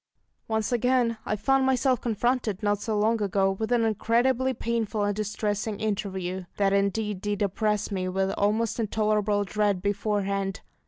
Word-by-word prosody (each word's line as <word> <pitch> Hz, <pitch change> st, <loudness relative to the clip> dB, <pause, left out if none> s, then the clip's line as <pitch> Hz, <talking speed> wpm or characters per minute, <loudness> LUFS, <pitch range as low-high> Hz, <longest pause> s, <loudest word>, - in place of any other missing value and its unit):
Once 220 Hz, 0 st, -1 dB
again 245 Hz, -1 st, +2 dB
I 215 Hz, -, +1 dB
found 270 Hz, +6 st, +2 dB
myself 260 Hz, -1 st, +2 dB
confronted, 235 Hz, -2 st, -1 dB
not 205 Hz, 0 st, +1 dB
so 220 Hz, -2 st, -1 dB
long 220 Hz, +2 st, +2 dB
ago, 195 Hz, -1 st, +2 dB
with 220 Hz, +4 st, -3 dB
an 235 Hz, -2 st, +3 dB
incredibly 240 Hz, +4 st, +2 dB
painful 225 Hz, -3 st, -1 dB
and 205 Hz, 0 st, 0 dB
distressing 210 Hz, 0 st, -2 dB
interview. 190 Hz, -3 st, -3 dB
That 195 Hz, -1 st, +2 dB
indeed 200 Hz, 0 st, 0 dB
did 205 Hz, 0 st, -1 dB
oppress 210 Hz, +1 st, 0 dB
me 185 Hz, -2 st, -2 dB
with 190 Hz, +1 st, 0 dB
almost 215 Hz, +4 st, 0 dB
intolerable 210 Hz, -1 st, +1 dB
dread 205 Hz, -1 st, 0 dB
beforehand. 200 Hz, -1 st, -1 dB
210 Hz, 150 wpm, -26 LUFS, 200-225 Hz, -, an